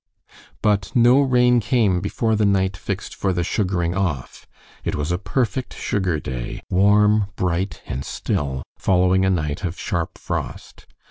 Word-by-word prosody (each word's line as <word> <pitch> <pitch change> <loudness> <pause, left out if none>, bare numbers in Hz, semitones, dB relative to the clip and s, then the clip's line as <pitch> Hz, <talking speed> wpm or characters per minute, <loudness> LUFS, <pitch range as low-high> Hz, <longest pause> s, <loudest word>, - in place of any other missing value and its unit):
But 100 -4 +1
no 120 +3 +6
rain 125 -2 +4
came 100 -5 +2
before 110 +2 0
the 110 - +1
night 95 -2 +2
fixed 100 +1 -5
for 95 -1 -1
the 90 -1 0
sugaring 90 -3 0
off. 85 -9 -3 0.4
It - - -2
was 75 +3 -2
a 90 - 0
perfect 125 +3 -2
sugar 95 -6 -1
day, 65 -3 -5
warm, 105 +2 +4
bright, 90 +1 -2
and 65 +2 -4
still, 65 -2 -2 0.2
following 95 0 +3
a - - +3
night 75 -3 -1
of 90 0 -3
sharp 85 -6 -3
frost. - - -6
95 Hz, 150 wpm, -22 LUFS, 85-105 Hz, 0.4 s, no